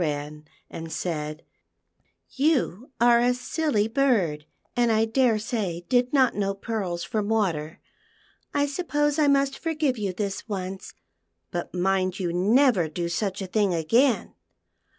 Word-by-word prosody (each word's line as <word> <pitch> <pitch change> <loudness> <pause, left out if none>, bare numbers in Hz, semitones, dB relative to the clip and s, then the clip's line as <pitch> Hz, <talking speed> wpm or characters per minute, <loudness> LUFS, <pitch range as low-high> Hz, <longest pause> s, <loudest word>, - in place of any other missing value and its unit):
Wren, 150 -1 -3 0.2
and 165 0 -8
said, 155 -3 -4 0.9
"You 265 - 0
are 235 0 +5
a 245 +1 +2
silly 250 -4 0
bird, 215 - +1 0.3
and 240 -1 +3
I 220 0 +3
daresay 220 -6 0
did 250 0 +2
not 260 -4 +4
know 195 -1 -1
pearls 195 -5 -3
from 210 -1 -2
water. 170 -9 -1 0.7
I 285 0 +1
suppose 295 -1 0
I 300 - +4
must 275 -1 +2
forgive 305 -7 -1
you 200 -2 -1
this 200 +3 -4
once, 190 - -5 0.6
but 175 +1 -4
mind 185 +1 0
you 175 -3 -1
never 205 - +3
do 170 +2 -3
such 195 +2 -2
a - - -3
thing 195 -1 +1
again." 230 - +2
210 Hz, 135 wpm, -25 LUFS, 175-255 Hz, 0.9 s, are